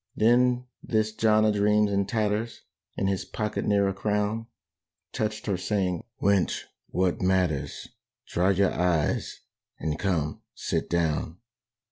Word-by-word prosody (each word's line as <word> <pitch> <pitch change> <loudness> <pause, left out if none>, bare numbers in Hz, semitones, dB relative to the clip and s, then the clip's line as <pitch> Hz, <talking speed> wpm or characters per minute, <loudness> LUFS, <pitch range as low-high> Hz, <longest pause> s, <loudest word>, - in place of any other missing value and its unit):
Then 125 +2 +3 0.2
this 110 -1 0
John 110 -1 +3
a 110 - +4
dreams, 105 0 +3
in 100 -1 +1
tatters, 110 0 -1 0.4
In 95 - 0
his 95 0 0
pocket 105 +3 -3
ne'er 100 -1 +3
a 95 - 0
crown, 105 +3 -1 0.7
Touched 110 0 -2
her 100 -3 0
saying, 90 -2 -1 0.2
"Wench, 100 -2 +2 0.2
what 90 -1 0
matters! 90 -6 0 0.4
Dry 90 +2 +1
your 95 0 +3
eyes 85 -4 0 0.4
and, 75 0 -2
come, 80 -6 -1
sit - - -2
down. 80 -1 0
100 Hz, 130 wpm, -27 LUFS, 90-110 Hz, 0.7 s, a